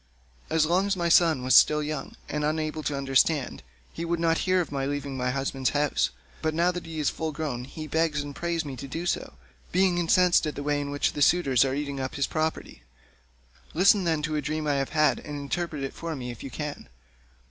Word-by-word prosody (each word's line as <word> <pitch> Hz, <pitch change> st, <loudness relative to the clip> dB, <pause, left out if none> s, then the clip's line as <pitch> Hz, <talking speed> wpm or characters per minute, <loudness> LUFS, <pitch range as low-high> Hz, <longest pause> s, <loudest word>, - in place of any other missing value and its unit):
As 160 Hz, -1 st, +3 dB
long 180 Hz, +5 st, +2 dB
as 200 Hz, -1 st, 0 dB
my 170 Hz, -1 st, 0 dB
son 160 Hz, -6 st, +4 dB
was 130 Hz, -, +2 dB
still 150 Hz, 0 st, +6 dB
young, 150 Hz, -2 st, -5 dB
and 150 Hz, +1 st, -2 dB
unable 155 Hz, +1 st, -1 dB
to 145 Hz, -2 st, -2 dB
understand, 135 Hz, +1 st, +1 dB, 0.3 s
he 165 Hz, -, -5 dB
would 170 Hz, 0 st, -1 dB
not 165 Hz, -1 st, +2 dB
hear 185 Hz, 0 st, +4 dB
of 170 Hz, -, -2 dB
my 135 Hz, -1 st, -2 dB
leaving 140 Hz, -1 st, -3 dB
my 125 Hz, -1 st, -1 dB
husband's 135 Hz, 0 st, -1 dB
house, 145 Hz, 0 st, +1 dB, 0.3 s
but 155 Hz, 0 st, -1 dB
now 170 Hz, +2 st, +3 dB
that 180 Hz, -2 st, -6 dB
he 160 Hz, -1 st, -5 dB
is 150 Hz, -, +1 dB
full 160 Hz, -1 st, -3 dB
grown 145 Hz, -6 st, -4 dB
he 155 Hz, +3 st, -8 dB
begs 160 Hz, -1 st, 0 dB
and 145 Hz, -1 st, -8 dB
prays 170 Hz, -2 st, -2 dB
me 140 Hz, -2 st, -5 dB
to 140 Hz, -, -7 dB
do 165 Hz, +6 st, -5 dB
so, -, -, -2 dB, 0.4 s
being 180 Hz, -1 st, +3 dB
incensed 175 Hz, -1 st, +4 dB
at 150 Hz, -, -4 dB
the 145 Hz, -, -5 dB
way 145 Hz, 0 st, 0 dB
in 140 Hz, -, -4 dB
which 145 Hz, 0 st, 0 dB
the 145 Hz, -, -4 dB
suitors 140 Hz, -6 st, +4 dB
are 135 Hz, -1 st, -1 dB
eating 140 Hz, -1 st, -3 dB
up 130 Hz, 0 st, -4 dB
his 140 Hz, -, +1 dB
property. 155 Hz, -, -3 dB, 0.9 s
Listen, 195 Hz, +3 st, +5 dB
then, 160 Hz, -3 st, 0 dB
to 155 Hz, 0 st, -1 dB
a 150 Hz, -, 0 dB
dream 155 Hz, +2 st, -2 dB
that 150 Hz, -, 0 dB
I -, -, +1 dB
have 135 Hz, -, -2 dB
had 155 Hz, -1 st, +2 dB
and 150 Hz, -1 st, -7 dB
interpret 150 Hz, +1 st, -3 dB
it 135 Hz, -, -4 dB
for 165 Hz, -1 st, -5 dB
me 125 Hz, -3 st, -5 dB
if 120 Hz, -, -11 dB
you 135 Hz, -, -6 dB
can. 150 Hz, -, -6 dB
150 Hz, 235 wpm, -27 LUFS, 140-165 Hz, 0.9 s, still